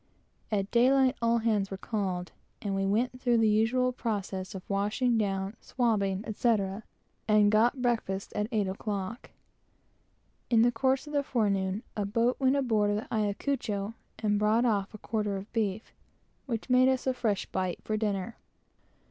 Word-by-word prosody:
At 200 Hz, -2 st, -1 dB
daylight 260 Hz, +2 st, +4 dB
all 230 Hz, 0 st, +3 dB
hands 215 Hz, -4 st, +1 dB
were 195 Hz, -, -5 dB
called, 190 Hz, -4 st, -3 dB, 0.3 s
and 200 Hz, -2 st, -3 dB
we 195 Hz, 0 st, 0 dB
went 250 Hz, +5 st, 0 dB
through 245 Hz, -2 st, +3 dB
the 225 Hz, -1 st, +4 dB
usual 225 Hz, +4 st, +2 dB
process 200 Hz, -5 st, -4 dB
of 185 Hz, -, -8 dB
washing 210 Hz, +5 st, +1 dB
down, 195 Hz, -1 st, -1 dB
swabbing, 205 Hz, -6 st, 0 dB
etc., 210 Hz, -2 st, 0 dB, 0.5 s
and 210 Hz, -1 st, +5 dB
got 240 Hz, +4 st, +3 dB
breakfast 220 Hz, -5 st, -1 dB
at 210 Hz, 0 st, -1 dB
eight 210 Hz, -4 st, +1 dB
o'clock. 200 Hz, +3 st, -4 dB, 1.2 s
In 230 Hz, -2 st, +5 dB
the 240 Hz, -, +4 dB
course 260 Hz, +3 st, +1 dB
of 295 Hz, -, -9 dB
the 285 Hz, -, +3 dB
forenoon, 200 Hz, -6 st, 0 dB
a 205 Hz, -, -1 dB
boat 230 Hz, +4 st, +1 dB
went 265 Hz, 0 st, +3 dB
aboard 220 Hz, -7 st, +2 dB
of 205 Hz, -, +1 dB
the 215 Hz, -, -5 dB
Ayacucho 210 Hz, -1 st, -1 dB, 0.2 s
and 210 Hz, -2 st, +1 dB
brought 215 Hz, +3 st, +3 dB
off 205 Hz, -4 st, +1 dB
a -, -, -7 dB
quarter 210 Hz, -2 st, -2 dB
of 195 Hz, +2 st, -10 dB
beef, 215 Hz, -2 st, -2 dB, 0.5 s
which 230 Hz, -4 st, -3 dB
made 255 Hz, 0 st, +5 dB
us 260 Hz, -1 st, 0 dB
a 260 Hz, -, +2 dB
fresh 225 Hz, -5 st, -1 dB
bite 185 Hz, -2 st, -3 dB
for 215 Hz, -, -2 dB
dinner. 210 Hz, 0 st, -2 dB
215 Hz, 165 wpm, -29 LUFS, 200-240 Hz, 1.2 s, and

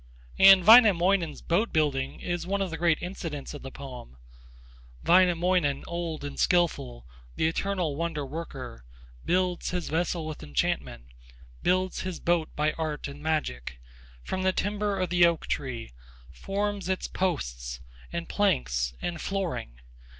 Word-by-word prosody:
And 190 Hz, -2 st, +8 dB
Wainamoinen's 195 Hz, -7 st, +6 dB
boat 200 Hz, +8 st, +1 dB
building 140 Hz, -4 st, 0 dB
is 175 Hz, 0 st, -3 dB
one 200 Hz, +1 st, 0 dB
of 195 Hz, -3 st, -2 dB
the 165 Hz, -, -4 dB
great 170 Hz, -2 st, +3 dB
incidents 165 Hz, -6 st, -5 dB
of 145 Hz, -, -8 dB
the 135 Hz, -, -7 dB
poem: 125 Hz, -, -10 dB, 0.9 s
Wainamoinen 175 Hz, -4 st, +3 dB
old 170 Hz, -3 st, -4 dB
and 145 Hz, -1 st, -6 dB
skilful, 155 Hz, -, +1 dB, 0.3 s
The 160 Hz, -, +1 dB
eternal 175 Hz, -2 st, -1 dB
wonder 165 Hz, -2 st, -2 dB
worker, 135 Hz, -, -7 dB, 0.4 s
Builds 180 Hz, 0 st, 0 dB
his 180 Hz, -1 st, -3 dB
vessel 165 Hz, 0 st, -1 dB
with 155 Hz, -1 st, -6 dB
enchantment, 70 Hz, -3 st, -2 dB, 0.6 s
Builds 185 Hz, +1 st, +1 dB
his 185 Hz, -2 st, -4 dB
boat 170 Hz, -2 st, +1 dB
by 150 Hz, +1 st, +1 dB
art 155 Hz, -2 st, -3 dB
and 140 Hz, +1 st, -10 dB
magic, 65 Hz, -, -2 dB, 0.4 s
From 185 Hz, -, -3 dB
the 190 Hz, 0 st, +3 dB
timber 205 Hz, 0 st, -1 dB
of 185 Hz, -2 st, -1 dB
the 175 Hz, -1 st, +4 dB
oak 170 Hz, -2 st, -1 dB
tree, 120 Hz, -, -4 dB, 0.4 s
Forms 200 Hz, -, -3 dB
its 190 Hz, -, -1 dB
posts 60 Hz, -, -3 dB, 0.3 s
and 170 Hz, 0 st, -4 dB
planks -, -, 0 dB
and 170 Hz, -3 st, -3 dB
flooring. 170 Hz, -, -3 dB
170 Hz, 140 wpm, -27 LUFS, 140-185 Hz, 0.9 s, And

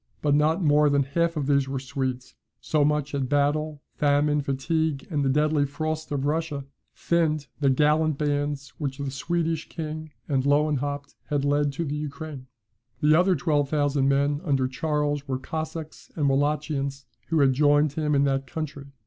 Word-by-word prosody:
But 145 Hz, -1 st, +3 dB
not 155 Hz, +5 st, +2 dB
more 150 Hz, -1 st, +4 dB
than 140 Hz, -1 st, +3 dB
half 165 Hz, +4 st, 0 dB
of 145 Hz, -, -1 dB
these 140 Hz, -1 st, +2 dB
were 135 Hz, -1 st, -2 dB
Swedes; 130 Hz, -1 st, -4 dB, 0.3 s
so 150 Hz, -2 st, +1 dB
much 150 Hz, -1 st, +1 dB
had 135 Hz, -3 st, -2 dB
battle, 145 Hz, +1 st, 0 dB
famine, 145 Hz, 0 st, +2 dB
fatigue, 140 Hz, +2 st, -1 dB
and 145 Hz, -2 st, 0 dB
the 135 Hz, -, +2 dB
deadly 150 Hz, +1 st, +2 dB
frosts 155 Hz, +2 st, -3 dB
of 140 Hz, -1 st, -1 dB
Russia, 150 Hz, -2 st, -1 dB, 0.3 s
thinned 155 Hz, -3 st, +1 dB
the 140 Hz, -2 st, +3 dB
gallant 150 Hz, +2 st, +3 dB
bands 145 Hz, -1 st, -1 dB
which 135 Hz, -3 st, -3 dB
the 140 Hz, -1 st, -3 dB
Swedish 165 Hz, +2 st, -2 dB
king 155 Hz, -1 st, -5 dB, 0.2 s
and 135 Hz, -3 st, +1 dB
Lewenhaupt 145 Hz, 0 st, 0 dB
had 145 Hz, -1 st, -1 dB
led 145 Hz, 0 st, +2 dB
to 165 Hz, +4 st, -2 dB
the 145 Hz, -, -3 dB
Ukraine. 150 Hz, -2 st, -6 dB, 0.5 s
The 150 Hz, +1 st, +4 dB
other 180 Hz, +3 st, +4 dB
twelve 145 Hz, -2 st, +1 dB
thousand 145 Hz, -2 st, +2 dB
men 140 Hz, +1 st, +1 dB
under 135 Hz, -6 st, +1 dB
Charles 145 Hz, +1 st, -1 dB
were 130 Hz, -1 st, -1 dB
Cossacks 155 Hz, +3 st, -6 dB
and 150 Hz, -3 st, +1 dB
Wallachians, 140 Hz, -1 st, 0 dB, 0.2 s
who 165 Hz, -1 st, +1 dB
had 135 Hz, -1 st, +4 dB
joined 145 Hz, +1 st, +3 dB
him 150 Hz, -1 st, 0 dB
in 140 Hz, -, +4 dB
that 135 Hz, -1 st, 0 dB
country. 145 Hz, -1 st, -5 dB
145 Hz, 170 wpm, -25 LUFS, 140-155 Hz, 0.5 s, more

